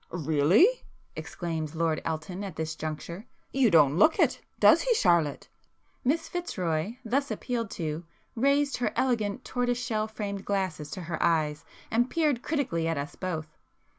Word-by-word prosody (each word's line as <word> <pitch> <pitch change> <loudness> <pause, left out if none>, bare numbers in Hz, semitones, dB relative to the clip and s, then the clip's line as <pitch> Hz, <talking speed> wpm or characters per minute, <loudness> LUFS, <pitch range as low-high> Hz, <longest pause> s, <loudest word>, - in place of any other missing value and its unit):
"Really!" 160 - +4 0.5
exclaimed 165 -3 -4
Lord 160 -1 0
Elton 165 +5 -4
at 190 -5 -6
this 160 0 -3
juncture—"You 170 - -3
don't 155 -4 +5
look 310 - +5
it, - - +2 0.2
does - - +7
he - - +2
Charlotte?" 170 - +2 0.6
Miss 325 +6 +1
Fitzroy 185 - -2
thus 275 +5 0
appealed 235 -4 -3
to, 160 -1 -3 0.3
raised 280 +3 +2
her 245 - 0
elegant 240 -2 0
tortoise 245 -1 0
shell 220 -3 -1
framed 200 -2 -5
glasses 185 -7 -2
to 185 - -6
her 165 0 -4
eyes 155 -3 +1 0.3
and 240 +3 +2
peered 300 -7 +1
critically 245 - -1
at 165 -2 0
us 140 +3 -5
both. 160 -4 -5
185 Hz, 145 wpm, -28 LUFS, 160-245 Hz, 0.6 s, does